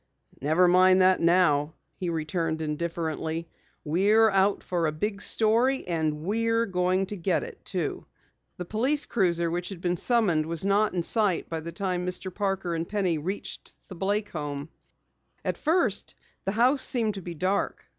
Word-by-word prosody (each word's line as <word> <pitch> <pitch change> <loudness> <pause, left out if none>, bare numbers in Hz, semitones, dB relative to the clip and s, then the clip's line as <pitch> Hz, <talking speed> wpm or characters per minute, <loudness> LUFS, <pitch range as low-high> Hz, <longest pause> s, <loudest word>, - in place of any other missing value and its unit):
"Never 160 +6 +3
mind 185 +1 +5
that 185 0 +4
now," 165 -4 +3 0.2
he 180 - -3
returned 160 0 -2
indifferently. 160 +1 -3 0.4
"We're 205 +8 +4
out 195 +1 +2
for 170 -3 0
a - - 0
big 200 +6 -3
story, 235 +5 +2
and 155 -3 -1
we're 230 +4 +1
going 185 -1 +1
to 205 - -6
get 185 - 0
it 475 +1 -10
too!" - - -3 0.5
The 180 - -5
police 260 - 0
cruiser 170 -6 +1
which 175 +1 -3
had 195 -4 -7
been 175 0 -1
summoned 185 -11 +2
was 170 +2 -2
not 200 0 +2
in 175 - 0
sight 205 -2 +1
by 165 - -3
the 165 +1 -7
time 180 0 -2
Mr. 180 +1 -4
Parker 195 -3 -1
and 165 0 -3
Penny 185 -6 0
reached 185 +7 -5
the 190 - -8
Blake 205 +3 -1
home. 145 -1 -5 0.8
At - - 0
first 310 - 0
glance, - - -33
the 195 - 0
house 255 +5 +3
seemed 225 -4 +1
to 195 - -7
be 175 -1 -7
dark. 185 +5 -1
185 Hz, 170 wpm, -27 LUFS, 165-205 Hz, 0.8 s, mind